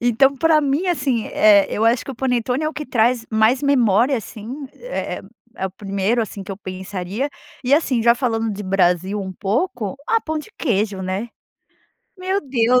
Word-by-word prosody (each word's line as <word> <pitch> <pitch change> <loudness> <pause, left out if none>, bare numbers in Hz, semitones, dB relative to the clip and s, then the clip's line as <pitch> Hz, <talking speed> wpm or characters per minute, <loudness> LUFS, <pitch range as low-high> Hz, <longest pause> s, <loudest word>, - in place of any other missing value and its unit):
Então, 245 +3 +3
pra 320 +1 +4
mim 290 +6 0
assim, 265 -9 0
eh, 205 -2 +5
eu 220 - 0
acho 230 +1 +3
que - - -6
o - - -6
panetone 250 +2 0
é - - +1
o 315 - -6
que 300 +1 -5
traz 235 -1 +2
mais 220 +5 +3
memória 250 -2 +3
assim. 235 +5 -7
É - - -4
é - - -8 0.3
é 190 - -2
o - - -7
primeiro 200 +4 -1
assim 210 -2 -4
que 195 - -9
eu 195 - -4
pensaria. 190 +5 -4 0.3
E, 255 +2 0
assim 270 -6 +3
já 235 +1 +6
falando 225 -3 -1
de 205 +1 -6
Brasil 185 +1 +1
um 190 -1 -5
pouco, 215 - -2
ah 455 0 +2
pão 315 -4 -3
de 305 - -9
queijo 205 -7 0
né? 190 +5 -3 0.9
Meu 375 +2 0
Deus! 250 - +2
235 Hz, 190 wpm, -21 LUFS, 200-275 Hz, 0.9 s, já